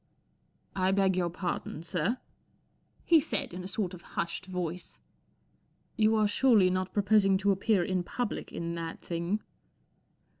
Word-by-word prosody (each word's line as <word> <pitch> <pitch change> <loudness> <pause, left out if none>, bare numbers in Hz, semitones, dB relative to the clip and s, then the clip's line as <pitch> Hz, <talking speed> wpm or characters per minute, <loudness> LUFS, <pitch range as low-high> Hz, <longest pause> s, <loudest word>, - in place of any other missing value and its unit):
'* - - -41
1 190 0 +2
beg 190 -2 +3
your 175 -1 +1
pardon, 175 -2 -4
sir," 180 +7 -1 0.9
he 330 -2 +6
said, 220 - -2
in 180 +1 -6
a - - -5
sort 190 -1 -2
of 180 - -9
hushed 170 +3 -4
voice 180 -1 -5 0.5
" - - -41
You 220 0 +3
are 215 -1 +3
surely 205 -4 +4
not 185 0 -1
proposing 200 -1 +4
to 200 +1 +2
appear 195 0 +2
in 185 +1 0
public 240 +6 -4
in 170 0 -4
that 165 -1 -5
thing 170 +5 -2
190 Hz, 155 wpm, -30 LUFS, 175-205 Hz, 0.9 s, he